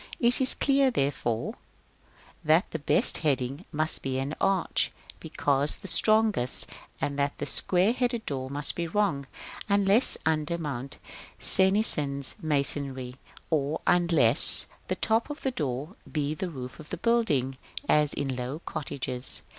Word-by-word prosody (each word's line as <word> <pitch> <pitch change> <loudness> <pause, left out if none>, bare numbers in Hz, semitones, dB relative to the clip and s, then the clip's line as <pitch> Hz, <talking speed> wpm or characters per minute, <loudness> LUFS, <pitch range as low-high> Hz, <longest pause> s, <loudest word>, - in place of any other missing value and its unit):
It 240 +2 +3
is 260 - +2
clear, 275 -1 +2
therefore, 135 - -2 0.9
that 160 +5 +2
the 160 - -4
best 145 - +3
heading 140 +1 -2
must 155 0 -2
be 130 -1 -3
an 135 +3 -3
arch, 195 -3 0 0.3
because 140 +1 0
the 195 - -9
strongest, 215 - +3 0.3
and 145 0 -3
that 140 0 0
a 145 - -3
square 180 +8 +3
headed 245 -2 -2
door 130 -2 -4
must 145 +1 0
be 170 -1 -4
wrong, 160 -7 -1 0.4
unless 200 +4 +4
under 160 +1 0
Mont 140 -5 -6 0.4
Cenisian 190 -8 +3 0.2
masonry; 140 -4 0 0.3
or 150 0 0
else, - - +4
unless 155 -8 +4 0.2
the - - -2
top 225 +4 0
of 295 - -7
the 265 - -1
door 145 - -4 0.2
be 150 -1 -2
the 185 +3 -5
roof 130 -5 -9
of 155 - -12
the - - -4
building, 145 - 0 0.3
as 150 -1 +3
in 135 -2 -3
low 125 +3 -5
cottages. 135 -5 +1
150 Hz, 145 wpm, -27 LUFS, 135-195 Hz, 0.9 s, unless